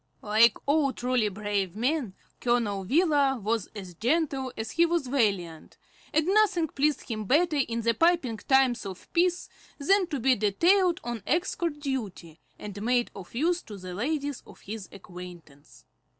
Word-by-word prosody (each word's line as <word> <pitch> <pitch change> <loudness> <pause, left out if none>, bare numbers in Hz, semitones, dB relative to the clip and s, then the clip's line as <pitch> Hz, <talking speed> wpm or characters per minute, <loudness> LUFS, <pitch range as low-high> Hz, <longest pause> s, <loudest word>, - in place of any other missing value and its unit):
Like 220 +2 +4
all 285 -1 +2
truly 245 -3 0
brave 200 -2 -2
men, 245 -3 -1 0.2
Colonel 225 -5 0
Wheeler 285 - +3
was 215 -1 -1
as 190 -4 -8
gentle 265 - 0
as 220 0 -4
he 335 - +3
was 340 -3 +1
valiant, 200 - -1 0.3
and 310 0 +2
nothing 385 -4 +3
pleased 290 0 0
him 215 -3 -4
better 305 - +2
in 235 -4 0
the 230 +1 +2
piping 330 -5 +2
times 265 +1 +2
of 190 -2 -8
peace 355 +1 +1 0.3
than 375 +6 +2
to 295 -5 -3
be 260 +2 +4
detailed 340 - +3
on 240 -2 -4
escort 335 -1 -1
duty, 205 - -5 0.2
and 205 -1 -8
made 240 +2 +1
of 195 +2 -11
use 340 +7 +1
to 210 - -10
the 185 -1 -8
ladies 285 - -2
of - - -15
his 210 -1 -7
acquaintance. 175 -6 -12
245 Hz, 155 wpm, -27 LUFS, 205-310 Hz, 0.3 s, Like